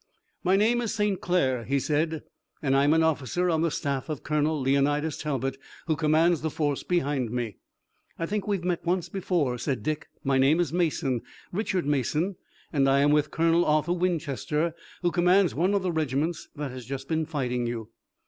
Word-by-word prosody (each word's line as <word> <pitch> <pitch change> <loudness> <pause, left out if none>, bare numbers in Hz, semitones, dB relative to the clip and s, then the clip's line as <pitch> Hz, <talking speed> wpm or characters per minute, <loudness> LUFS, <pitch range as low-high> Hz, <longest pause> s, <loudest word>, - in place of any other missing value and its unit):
"My 185 +2 +4
name 225 +4 +3
is 225 -2 -2
St. 210 -2 0
Clair," 130 -9 +1
he 140 +4 0
said, 155 +2 0 0.4
"and 135 -2 +1
I'm 145 +3 +4
an 160 - +4
officer 160 +3 +1
on 160 -1 +1
the 165 - +2
staff 140 -1 -2
of 150 -3 -4
Colonel 150 0 +1
Leonidas 140 +3 +1
Talbot, 135 -3 -2 0.3
who 160 - +1
commands 160 +2 +3
the 160 - -1
force 145 -2 -1
behind 145 -8 0
me." 120 -4 -3 0.6
"I 165 - -2
think 205 +3 -3
we've 200 -4 0
met 180 -1 -1
once 175 0 0
before," 170 -10 -1
said 130 +2 -2
Dick. 155 0 -2 0.2
"My 135 -1 +2
name 140 +5 +4
is 170 -3 0
Mason, 155 -8 0 0.3
Richard 190 -3 -1
Mason, 150 - 0 0.4
and 135 -2 +3
I 135 +1 +4
am 145 +1 +4
with 150 0 +3
Colonel 165 +2 +3
Arthur 155 +2 +2
Winchester, 165 - -1 0.3
who 175 - +2
commands 180 +1 +4
one 180 +7 +1
of 200 - +1
the 185 - 0
regiments 155 +1 -1
that 145 -3 -4
has 125 -1 -8
just 135 0 -5
been 160 -1 0
fighting 125 -6 -1
you." 115 -2 -4
155 Hz, 185 wpm, -27 LUFS, 135-175 Hz, 0.6 s, My